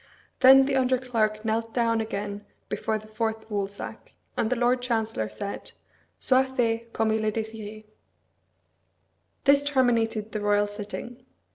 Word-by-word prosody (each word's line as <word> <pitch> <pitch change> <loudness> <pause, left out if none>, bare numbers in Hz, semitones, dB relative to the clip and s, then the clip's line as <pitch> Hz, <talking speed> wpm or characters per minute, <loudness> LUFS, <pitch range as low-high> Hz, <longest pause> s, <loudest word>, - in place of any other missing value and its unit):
Then 265 +1 +8
the 275 0 0
under 255 0 +3
clerk 220 -4 -1
knelt 225 +1 -1
down 230 -2 +2
again 205 -1 -4 0.3
before 220 -1 -1
the 215 - -11
fourth 220 0 -3
woolsack, 200 -1 -5 0.2
and 220 - 0
the 255 - +1
Lord 245 +1 +2
Chancellor 225 - -1
said, 200 -1 -6 0.4
"Soit 260 0 +2
fait 230 -1 0
comme 225 -1 +1
il 220 0 0
est 215 -1 0
désiré." 220 -1 -6 1.6
This 280 0 +5
terminated 230 -6 +1
the 215 - -3
royal 205 0 +2
sitting. 210 +4 -7
225 Hz, 140 wpm, -26 LUFS, 215-245 Hz, 1.6 s, Then